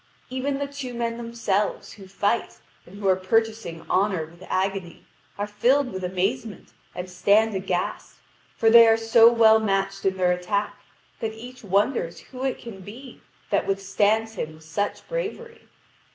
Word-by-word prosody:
Even 270 Hz, +2 st, -2 dB
the 285 Hz, -, -2 dB
two 275 Hz, -3 st, -7 dB
men 235 Hz, -1 st, -2 dB
themselves, 230 Hz, -4 st, -2 dB
who 195 Hz, -3 st, -13 dB
fight, 205 Hz, +4 st, -1 dB, 0.3 s
and 190 Hz, +3 st, -13 dB
who 200 Hz, -1 st, -2 dB
are 190 Hz, -, +5 dB
purchasing 215 Hz, -3 st, -1 dB
honour 190 Hz, -4 st, +1 dB
with 170 Hz, +3 st, -18 dB
agony, 190 Hz, -2 st, -2 dB, 0.3 s
are 205 Hz, -, -1 dB
filled 250 Hz, +5 st, +1 dB
with 190 Hz, 0 st, -5 dB
amazement 195 Hz, +4 st, -2 dB, 0.3 s
and 180 Hz, +1 st, -5 dB
stand 205 Hz, +4 st, +3 dB
aghast, 185 Hz, -2 st, -3 dB, 0.4 s
for 225 Hz, -1 st, +4 dB
they 230 Hz, 0 st, +9 dB
are 225 Hz, 0 st, +5 dB
so 225 Hz, +1 st, +6 dB
well 220 Hz, -2 st, +6 dB
matched 195 Hz, -2 st, -1 dB
in 190 Hz, -1 st, 0 dB
their 180 Hz, -1 st, +3 dB
attack, 190 Hz, +4 st, -1 dB, 0.4 s
that 220 Hz, -1 st, -3 dB
each 245 Hz, +3 st, -11 dB
wonders 200 Hz, -2 st, 0 dB
who 255 Hz, 0 st, -9 dB
it 265 Hz, -1 st, -1 dB
can 230 Hz, -5 st, -10 dB
be 230 Hz, +8 st, -11 dB, 0.3 s
that -, -, +1 dB
withstands 205 Hz, +3 st, +1 dB
him 155 Hz, -6 st, -5 dB
with 160 Hz, -, -17 dB
such 180 Hz, +6 st, -3 dB
bravery. 475 Hz, -2 st, -5 dB
210 Hz, 160 wpm, -24 LUFS, 190-235 Hz, 0.4 s, they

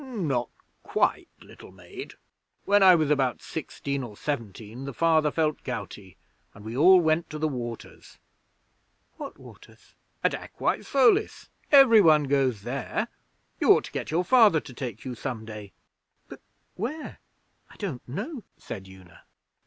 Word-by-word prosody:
'Not 165 Hz, -, -2 dB, 0.3 s
quite, -, -, 0 dB
little -, -, -14 dB
maid. 90 Hz, -2 st, -10 dB, 0.5 s
When 205 Hz, 0 st, +4 dB
I 185 Hz, -2 st, +8 dB
was 155 Hz, -3 st, +1 dB
about 135 Hz, -4 st, +1 dB
sixteen 140 Hz, -2 st, -5 dB
or 110 Hz, -5 st, -9 dB
seventeen, 115 Hz, -2 st, -5 dB
the 140 Hz, -3 st, -7 dB
Father 160 Hz, -2 st, +3 dB
felt 155 Hz, 0 st, -1 dB
gouty, 100 Hz, -7 st, -7 dB, 0.4 s
and 105 Hz, +1 st, -13 dB
we 110 Hz, +2 st, -6 dB
all 180 Hz, +7 st, +7 dB
went 160 Hz, 0 st, +1 dB
to 155 Hz, -, -6 dB
the 155 Hz, +1 st, 0 dB
Waters.' 120 Hz, -5 st, -7 dB, 1.0 s
'What -, -, -8 dB
waters?' -, -, -17 dB, 0.3 s
'At -, -, +2 dB
Aquae -, -, -2 dB
Solis. 280 Hz, -, +2 dB, 0.2 s
Every 265 Hz, -7 st, +8 dB
one 155 Hz, -4 st, +5 dB
goes 135 Hz, -6 st, 0 dB
there. 125 Hz, +3 st, -3 dB, 0.5 s
You -, -, +6 dB
ought -, -, +1 dB
to -, -, -9 dB
get -, -, -5 dB
your 170 Hz, +3 st, +1 dB
Father 220 Hz, -7 st, +5 dB
to 135 Hz, -, -12 dB
take 120 Hz, -3 st, -7 dB
you 130 Hz, -, -4 dB
some 120 Hz, -2 st, -5 dB
day.' 105 Hz, -3 st, -9 dB, 0.6 s
'But -, -, -12 dB, 0.3 s
where? 290 Hz, -, -6 dB, 0.5 s
I -, -, -17 dB
don't 170 Hz, -, -5 dB
know,' 250 Hz, -, -5 dB
said 95 Hz, -3 st, -8 dB
Una. 95 Hz, -3 st, -16 dB
140 Hz, 150 wpm, -26 LUFS, 115-175 Hz, 1.0 s, I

